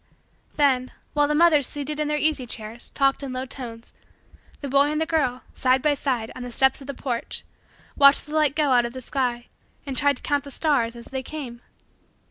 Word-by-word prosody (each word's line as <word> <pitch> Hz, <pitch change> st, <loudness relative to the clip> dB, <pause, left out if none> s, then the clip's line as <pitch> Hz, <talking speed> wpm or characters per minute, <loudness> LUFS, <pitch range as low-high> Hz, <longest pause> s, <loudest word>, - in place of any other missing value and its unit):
Then, 260 Hz, -4 st, +2 dB, 0.2 s
while 295 Hz, -1 st, +3 dB
the 300 Hz, -, 0 dB
mothers, 305 Hz, -4 st, +5 dB
seated 295 Hz, +1 st, -4 dB
in 300 Hz, -, 0 dB
their 300 Hz, 0 st, 0 dB
easy 295 Hz, -4 st, +1 dB
chairs, 225 Hz, +1 st, -6 dB
talked 275 Hz, 0 st, +2 dB
in 270 Hz, -2 st, -5 dB
low 255 Hz, +1 st, -3 dB
tones, 235 Hz, -3 st, -8 dB, 0.7 s
the 285 Hz, -, -4 dB
boy 280 Hz, +2 st, +4 dB
and 305 Hz, -, -1 dB
the 320 Hz, -, +1 dB
girl, 275 Hz, -6 st, 0 dB
side 260 Hz, 0 st, +2 dB
by 300 Hz, -1 st, +4 dB
side, 250 Hz, -6 st, -2 dB
on -, -, -7 dB
the 245 Hz, -, -5 dB
steps 265 Hz, +3 st, +3 dB
of 270 Hz, -, -11 dB
the 280 Hz, -, -5 dB
porch, 245 Hz, -3 st, -3 dB, 0.5 s
watched 280 Hz, 0 st, +6 dB
the 300 Hz, -, -10 dB
light 305 Hz, -3 st, +2 dB
go 295 Hz, -3 st, +2 dB
out 245 Hz, -1 st, +5 dB
of 235 Hz, -, -5 dB
the 260 Hz, -, -6 dB
sky 245 Hz, -2 st, -2 dB, 0.4 s
and 275 Hz, -2 st, -4 dB
tried 285 Hz, 0 st, +2 dB
to -, -, -12 dB
count 285 Hz, -1 st, 0 dB
the 285 Hz, -, -9 dB
stars 265 Hz, -6 st, 0 dB
as 235 Hz, -, -10 dB
they 265 Hz, 0 st, -4 dB
came. 255 Hz, -4 st, -7 dB
275 Hz, 215 wpm, -24 LUFS, 250-295 Hz, 0.7 s, watched